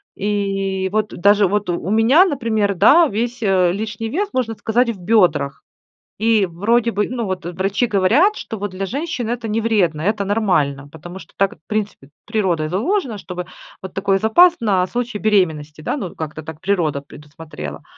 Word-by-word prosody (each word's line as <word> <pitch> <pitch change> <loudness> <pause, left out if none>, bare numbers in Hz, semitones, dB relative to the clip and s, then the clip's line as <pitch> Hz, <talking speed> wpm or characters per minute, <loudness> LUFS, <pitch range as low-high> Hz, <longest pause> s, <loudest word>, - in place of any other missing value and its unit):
И, 195 -2 -1
вот, 215 0 0
даже, 200 +2 +4
вот 205 0 -1
у 175 +1 -2
меня, 230 - +5
например, 225 - 0
да, 330 - +6
весь, 235 +2 -3
э, 190 -4 +3
лишний 215 +3 -4
вес, 400 - -1
можно 240 -3 -1
сказать, 235 +3 +1
в 220 -5 -4
бёдрах. 175 -8 +1 0.6
И, 220 -2 +3
вроде 225 +7 +1
бы, 210 -1 -1
ну 240 -2 -3
вот, 185 -3 -4
э, 175 - -4
врачи 195 +6 0
говорят, 235 - +3
что 225 - -6
вот 205 -1 -4
для 190 +1 -4
женщин 275 - -3
это 240 -1 -3
не 220 +1 -1
вредно, 190 -9 +1
это 200 +3 0
нормально. 175 -10 0
Потому 175 +4 -10
что - - -15
так 195 0 +1
в 155 - -46
принципе, 210 -10 -4 0.2
природой 185 -8 -1
заложено, 245 - -1
чтобы 180 -2 -6 0.4
вот 190 - -8
такой 195 0 +1
запас 275 - +5
на 190 -5 +1
случай 240 -2 -3
беременности, 160 -8 0
да, 285 - -2
ну 200 - -4
вот - - -17
как-то 155 0 -5
так 155 0 -10
природа 170 -8 0
предусмотрела. 145 - -10
205 Hz, 180 wpm, -19 LUFS, 180-225 Hz, 0.6 s, да